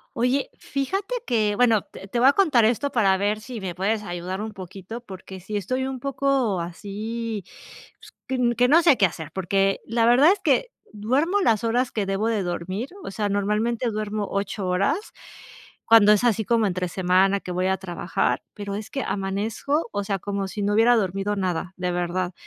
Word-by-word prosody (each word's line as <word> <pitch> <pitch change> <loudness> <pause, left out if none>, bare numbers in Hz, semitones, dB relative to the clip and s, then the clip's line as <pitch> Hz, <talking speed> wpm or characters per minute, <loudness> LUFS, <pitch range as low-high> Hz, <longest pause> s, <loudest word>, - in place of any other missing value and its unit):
Oye, 250 +3 0
fíjate 385 - -3
que 215 -4 +1
bueno, 230 -3 +4
t 195 - -12
te 235 - -2
voy 250 - +6
a - - +4
contar 295 - +4
esto 245 +5 +1
para 195 -5 +3
ver 205 +2 0
sí 240 0 -7
me 185 -3 -4
puedes 210 +4 -1
ayudar 180 +1 -4
un 220 0 -4
poquito, 195 +4 -8
porque 190 -3 -10
si 205 +4 -4
estoy 255 +7 -2
un 265 -1 -5
poco 270 -6 0
así, 210 +4 -5 0.6
pues, - - -16 0.4
qu - - -3
que 245 +1 +4
no 325 +6 +5
sé 320 -5 +6
qué 200 -5 +4
hacer 160 -3 -8
porque 195 +1 +1
la 230 0 +2
verdad 255 +8 +6
es 410 - 0
que - - +1 0.2
duermo 270 - +1
las 225 - +2
horas 240 +2 +1
que 210 -3 -1
debo 195 +3 -1
de 220 -4 0
dormir, 185 +7 -4
o - - -5
sea, 205 +1 -2
normalmente 210 +4 0
duermo 215 -1 -3
8 200 0 -3
horas 185 - +1 0.9
cuando 220 -2 +7
es 210 - +1
así 225 -3 +2
como 230 -1 +2
entre 180 -1 -2
semana 190 +2 +2
que 180 - -7
voy 180 +1 -1
a 190 0 +1
trabajar, 175 -1 -2
pero 200 -1 -5
es 210 0 -6
que 275 - -2
amanezco, 210 +9 -2
o 205 0 -2
sea, 195 -1 -2
como 200 0 -3
si 205 - -5
no 205 - +1
hubiera 230 +3 +5
dormido 195 -1 -1
nada 185 -2 -2
de 180 0 -1
verdad. 175 +1 -2
210 Hz, 195 wpm, -24 LUFS, 190-235 Hz, 0.9 s, cuando